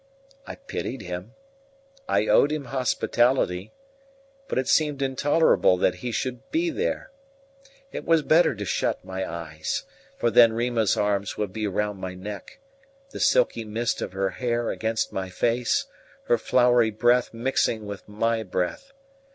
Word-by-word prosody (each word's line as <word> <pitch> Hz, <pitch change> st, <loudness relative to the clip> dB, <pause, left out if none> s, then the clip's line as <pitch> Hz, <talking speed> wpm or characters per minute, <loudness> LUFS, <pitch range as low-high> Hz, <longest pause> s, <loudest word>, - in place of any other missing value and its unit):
I -, -, -6 dB
pitied 135 Hz, -, -5 dB
him; 90 Hz, +6 st, -7 dB, 0.7 s
I -, -, +2 dB
owed 145 Hz, -, +4 dB
him 150 Hz, -2 st, -3 dB
hospitality; 120 Hz, -6 st, +1 dB, 0.8 s
but -, -, -3 dB
it 130 Hz, -, 0 dB
seemed 150 Hz, -3 st, +2 dB
intolerable 135 Hz, -, +3 dB
that 90 Hz, -, +1 dB
he 125 Hz, -, -3 dB
should 125 Hz, 0 st, -4 dB
be 335 Hz, +1 st, 0 dB
there. 465 Hz, +9 st, -2 dB, 0.8 s
It -, -, -5 dB
was 165 Hz, -2 st, +3 dB
better 155 Hz, -4 st, +4 dB
to 105 Hz, 0 st, -5 dB
shut 90 Hz, -, -1 dB
my 95 Hz, -1 st, -4 dB
eyes; 80 Hz, -2 st, -4 dB, 0.3 s
for 120 Hz, -, +1 dB
then 115 Hz, -1 st, +7 dB
Rima's 115 Hz, -2 st, +1 dB
arms 100 Hz, 0 st, 0 dB
would 105 Hz, -3 st, -3 dB
be 110 Hz, 0 st, -2 dB
round 105 Hz, 0 st, -2 dB
my 95 Hz, 0 st, -5 dB
neck; 100 Hz, +2 st, -8 dB, 0.5 s
the -, -, -7 dB
silky -, -, +3 dB
mist 110 Hz, +2 st, -2 dB
of -, -, -4 dB
her 95 Hz, 0 st, -1 dB
hair 120 Hz, 0 st, -1 dB
against 110 Hz, 0 st, -2 dB
my 95 Hz, -1 st, -3 dB
face, 120 Hz, +5 st, 0 dB, 0.4 s
her 120 Hz, -, +2 dB
flowery 125 Hz, -2 st, +3 dB
breath 120 Hz, +3 st, +2 dB
mixing 115 Hz, -2 st, 0 dB
with 100 Hz, 0 st, -8 dB
my 115 Hz, +2 st, 0 dB
breath. 100 Hz, -, -3 dB
115 Hz, 150 wpm, -25 LUFS, 100-130 Hz, 0.8 s, then